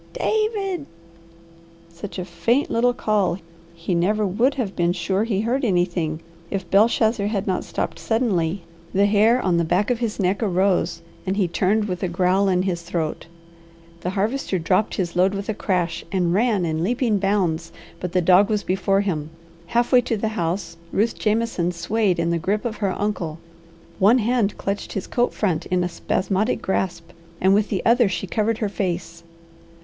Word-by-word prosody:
"David!" 400 -7 -1 1.1
Such 185 +4 -8
a 180 - -3
faint 230 - 0
little 245 +2 +3
call 205 -6 +1 0.4
he 170 +2 -3
never 205 +5 +1
would 235 +9 +1
have 225 -8 -3
been 175 0 +1
sure 190 +4 0
he 205 -4 0
heard 250 +5 0
anything 175 -6 0 0.3
if 190 -3 -3
Belshazzar 220 0 +3
had 205 -2 -1
not 185 -2 -1
stopped - - -4
suddenly. 195 -7 0 0.3
The 200 +1 +4
hair 215 +4 +4
on 180 -7 +1
the 170 - +2
back 180 +7 +1
of 240 - 0
his 230 -3 -2
neck 190 +2 +1
arose 185 -4 +1 0.2
and 190 +2 0
he 195 -4 +2
turned 200 +5 +1
with 180 -3 -4
a 185 - 0
growl 185 +3 +2
in 180 -1 +2
his 180 -3 -2
throat. 170 -2 -3 0.7
The 175 - -3
Harvester 205 +2 -1
dropped 185 +5 +1
his 175 -3 -2
load 185 +3 +3
with 200 +1 -5
a - - +1
crash 180 -5 -1
and 180 -3 +1
ran 210 -3 +2
in 160 0 -1
leaping 230 0 +1
bounds, 180 -5 0 0.3
but 180 - -4
the 180 - +2
dog 185 +4 +5
was 210 -2 0
before 195 +1 +1
him. 160 -7 -2 0.4
Half 240 +5 +1
way 250 -2 +7
to 230 -2 -2
the 215 +1 -1
house, 170 -4 -3
Ruth 220 +4 +1
Jameson 215 -5 0
swayed 185 +2 0
in 170 0 0
the 170 - 0
grip 205 +7 -1
of 220 -2 -3
her 195 -3 -2
uncle. 180 -7 -2 0.6
One 210 +6 +6
hand 230 -3 +1
clutched 200 +1 -3
his 195 - -3
coat 245 0 0
front 185 -7 -1
in 180 -1 +1
a - - 0
spasmodic 195 +5 -1
grasp, 185 -3 -2 0.3
and 190 +1 +4
with 210 +1 +2
the 195 - -2
other 235 -2 +4
she 190 - -3
covered 215 +3 0
her 215 - -1
face. 170 -4 -3
195 Hz, 180 wpm, -22 LUFS, 175-220 Hz, 1.1 s, way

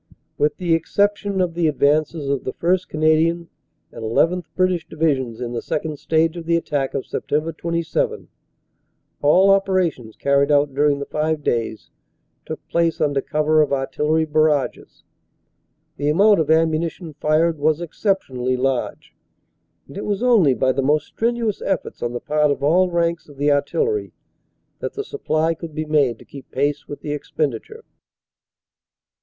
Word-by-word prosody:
"With 150 +1 0
the 175 -3 0
exception 200 +4 0
of 175 -2 0
the 170 -1 +1
advances 150 +1 +1
of 140 -1 -1
the 130 - -4
1st. 180 +2 0
Canadian 160 +2 +1 0.4
and 115 - -10
llth. 165 +10 +1
(British) 185 -3 +1
Divisions 135 -7 -1
in 120 -1 -4
the 115 - -3
second 155 -1 -3
stage 160 +2 +1
of 170 -1 -8
the 170 - +3
attack 145 -5 -2
of - - -1
Sept. 155 +2 -2
27, 170 -2 -2 0.9
all 185 +7 +5
operations 185 - 0
carried 140 0 +2
out 145 -1 +3
during 145 +1 +2
the 140 - -5
five 155 0 -2
days 115 -4 -2 0.6
took - - -7
place 170 -1 +1
under 145 -2 +1
cover 155 +2 +2
of 150 - +1
Artillery 150 +3 0
barrages. 155 -2 0 0.9
The 145 +1 0
amount 200 +6 +5
of 155 - 0
am 160 0 +4
munition 165 +1 -3
fired 155 +2 +1
was 155 +1 +2
exceptionally 145 - -1
large, 130 0 -2 0.7
and - - -13
it 200 - -5
was 205 +2 -2
only 205 - +4
by 130 +3 +2
the 135 - -1
most 150 +3 +2
strenuous 230 -2 -1
efforts 195 - -3
on 120 0 -2
the 120 - -3
part 150 +2 +1
of 140 - -1
all 180 +5 +3
ranks 170 -2 -1
of 145 - -15
the 145 +1 +2
Artillery 425 - 0 0.7
that - - -4
the 420 - -3
supply 165 - -1
could 160 -1 -9
be 155 0 -2
made 145 -6 +2
to - - -16
keep 135 -2 -12
pace 145 +2 -1
with 145 - -8
the - - -6
expendi 145 -4 -2
ture. - - -14
155 Hz, 160 wpm, -21 LUFS, 145-170 Hz, 0.9 s, all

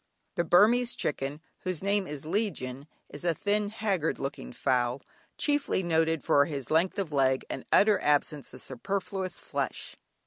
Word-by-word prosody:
The 170 - 0
Burmese 220 +9 +4
chicken, 145 +1 -2 0.2
whose 185 -1 -3
name 200 -1 +1
is 150 0 -6
legion, 150 - -2 0.2
is 145 - -8
a 170 -2 +1
thin 205 +2 0
haggard 200 -7 -1
looking 135 - -5
fowl, 125 +1 0 0.3
chiefly 290 -9 +1
noted 160 -2 +1
for 140 0 +4
his 140 -4 -5
length 170 +6 +2
of 190 -6 -2
leg, 130 -2 +2
and 130 - -5
utter 210 0 +5
absence 145 0 +1
of - - -10
superfluous 190 - -3
flesh. - - -4
165 Hz, 150 wpm, -29 LUFS, 140-200 Hz, 0.3 s, utter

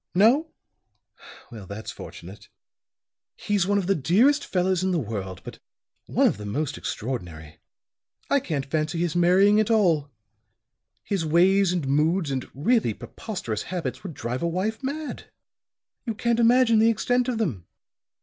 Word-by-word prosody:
No? 240 - +4 1.0
Well, 105 -5 -10
that's 100 +4 -7
fortunate. 95 +4 -11 0.9
He's 200 -3 0
one 205 0 +2
of 195 - 0
the 195 - +2
dearest 220 - +3
fellows 185 -1 0
in 190 - +1
the 180 - +1
world, 100 - -5
but - - -10 0.5
one - - +2
of - - +2
the 105 - -8
most 145 +7 -2
extraordinary. 85 - -6 0.7
I 280 - +3
can't 150 - -3
fancy 155 +3 -2
his 175 -1 -1
marrying 190 +4 +4
at 215 - +1
all. 170 -10 +2 0.9
His 195 -4 -2
ways 180 +4 +3
and 175 -6 -2
moods 155 +3 +1
and 130 -2 -3
really 150 - +1
preposterous 150 - -5
habits 155 -9 -4
would 180 -5 -8
drive 120 +2 -4
a 170 - 0
wife 190 +8 -2
mad. 290 +3 -5 0.8
You 225 - -2
can't 235 +1 0
imagine 235 -1 +5
the 225 +1 +5
extent 245 +2 +1
of 250 -3 -1
them. 135 - -3
175 Hz, 150 wpm, -25 LUFS, 135-215 Hz, 1.0 s, imagine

